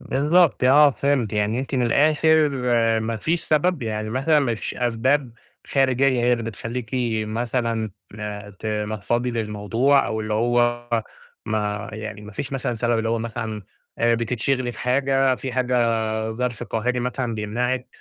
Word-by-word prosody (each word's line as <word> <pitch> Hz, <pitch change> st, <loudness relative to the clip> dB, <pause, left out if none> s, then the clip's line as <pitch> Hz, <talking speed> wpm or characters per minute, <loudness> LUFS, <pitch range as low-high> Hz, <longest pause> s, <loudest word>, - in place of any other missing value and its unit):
بالضبط، 150 Hz, +2 st, +2 dB
آه 145 Hz, +3 st, +7 dB
فهمت 140 Hz, -5 st, 0 dB
يعني 105 Hz, +3 st, 0 dB
أنتِ 135 Hz, +1 st, -5 dB
من 125 Hz, -, +1 dB
الآخر 155 Hz, +4 st, +4 dB, 0.5 s
ما 110 Hz, +1 st, -2 dB
فيش 160 Hz, +10 st, -1 dB
سبب 155 Hz, 0 st, +1 dB
يعني 110 Hz, -1 st, -3 dB
مثلًا 135 Hz, +5 st, +2 dB
ما 125 Hz, -5 st, 0 dB
فيش 110 Hz, -, -5 dB
أسباب 125 Hz, +2 st, 0 dB, 0.3 s
خارجية 135 Hz, -1 st, +2 dB, 0.2 s
هي 120 Hz, +1 st, +3 dB
اللي 120 Hz, -1 st, 0 dB
بتخلّيكِ 115 Hz, +2 st, -5 dB, 0.3 s
مثلًا 115 Hz, 0 st, -2 dB, 0.7 s
تنفّضي 110 Hz, +3 st, -2 dB
للموضوع 115 Hz, +5 st, +1 dB
أو 110 Hz, -, -2 dB
اللي 110 Hz, 0 st, -2 dB
هو 120 Hz, +1 st, +1 dB, 0.6 s
ما 105 Hz, -1 st, -2 dB
يعني 110 Hz, -1 st, -6 dB
ما 105 Hz, +1 st, -10 dB
فيش 130 Hz, +6 st, -5 dB
مثلًا 125 Hz, -2 st, -2 dB
سبب 120 Hz, 0 st, 0 dB
اللي 110 Hz, 0 st, -1 dB
هو 115 Hz, 0 st, +1 dB
مثلًا 110 Hz, -2 st, -4 dB, 0.4 s
آآ، 115 Hz, 0 st, +3 dB
بتتشغلي 120 Hz, +2 st, -1 dB
في -, -, -13 dB
حاجة 135 Hz, +1 st, +2 dB
في 130 Hz, 0 st, -6 dB
حاجة 125 Hz, 0 st, 0 dB, 0.6 s
ظرف 120 Hz, 0 st, -3 dB
قاهري 120 Hz, +3 st, -1 dB
مثلًا 125 Hz, -1 st, -2 dB
بيمنعِك، 125 Hz, +4 st, -2 dB
120 Hz, 145 wpm, -23 LUFS, 110-130 Hz, 0.7 s, آه